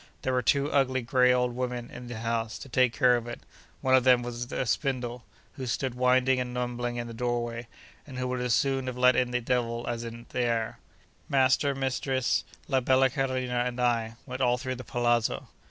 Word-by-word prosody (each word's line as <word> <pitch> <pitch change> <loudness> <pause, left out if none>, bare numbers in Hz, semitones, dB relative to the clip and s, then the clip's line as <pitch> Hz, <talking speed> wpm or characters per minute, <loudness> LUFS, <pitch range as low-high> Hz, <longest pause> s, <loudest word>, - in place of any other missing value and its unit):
There 130 - 0
were 125 - +2
two 140 +3 +2
ugly, 130 -2 +2
grey 125 +1 +4
old 125 -1 +1
women 125 -1 -3
in 125 0 -9
the 120 -2 -6
house, 115 0 -2
to - - -10
take 125 -1 +3
care 125 -1 +4
of 120 -1 -3
it; 120 - -7 0.4
one 130 - +2
of 130 -1 +6
them 125 -1 +5
with 120 0 -5
a - - -1
spindle, 125 -2 -2 0.3
who 130 -2 -4
stood 125 +2 -1
winding 130 +1 +3
and 125 -1 -3
mumbling 120 -1 -2
in 120 0 -3
the 115 - -8
doorway, 120 0 -2 0.4
and 130 -3 -8
who 125 0 -2
would 125 0 -2
as 125 -1 +2
soon 135 -1 0
have 125 -1 -4
let 125 0 +5
in 125 -1 +2
the 125 0 -1
devil 120 -1 -1
as 120 -1 -2
the 115 0 -8
air. 115 -3 -1 0.5
Master, 135 +1 +3
mistress, 130 -1 0 0.2
la 135 -2 +2
bella 130 +1 +3
Carolina, 130 -2 -1
and 125 0 -4
I, 115 -2 +1
went 130 +1 -6
all 125 -1 +3
through 130 +1 -3
the 125 - -7
palazzo. 120 -2 0
125 Hz, 205 wpm, -28 LUFS, 120-130 Hz, 0.5 s, of